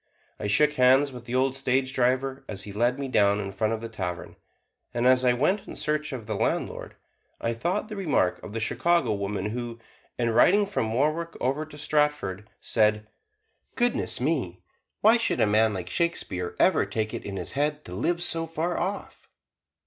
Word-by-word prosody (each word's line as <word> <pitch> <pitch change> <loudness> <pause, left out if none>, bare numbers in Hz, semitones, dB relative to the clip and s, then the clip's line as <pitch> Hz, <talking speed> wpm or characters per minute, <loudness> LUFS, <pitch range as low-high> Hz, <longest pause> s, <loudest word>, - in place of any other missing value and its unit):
I 105 - -3
shook 150 +9 +4
hands 130 +1 +4
with 125 -2 -10
the 120 +1 -4
old 130 +1 +2
stage 130 0 0
driver 130 +1 0
as 100 -2 -5
he 100 - -8
let 120 +5 +1
me 140 -1 -3
down 100 -5 +3
in 100 -1 -4
front 110 +3 -1
of 110 - -4
the 115 - -5
tavern; 90 -6 -5 0.6
and 120 +1 0
as 130 0 +5
I 125 -1 +4
went 155 +11 0
in - - -8
search 150 +1 -1
of 125 -5 -6
the 110 - -3
landlord, - - -2 0.4
I 115 - -1
thought 150 +11 -1
of 215 - -16
the 215 - -6
remark 155 - +1
of 105 - -9
the 115 - -2
Chicago 145 +2 +1
woman 100 0 -3
who, 120 0 -5 0.4
in 120 -1 +1
riding 200 - +5
from 110 - -2
Warwick 155 +7 0
over 140 +4 -1
to 150 - -12
Stratford, 150 -10 0
said, 105 -1 +1 0.7
"Goodness 240 -1 0
me! 125 - -1 0.4
why 220 +3 +6
should 230 - -1
a - - +5
man 110 +1 +3
like 95 -3 -5
Shakespeare 95 - -2
ever - - +3
take 110 -1 -2
it - - -5
in 100 -1 -5
his - - -4
head 150 +2 -1
to 90 - -8
live 170 - 0
so 165 -1 -1
far 165 +2 -2
off!" 195 +3 -5
125 Hz, 195 wpm, -26 LUFS, 110-150 Hz, 0.7 s, why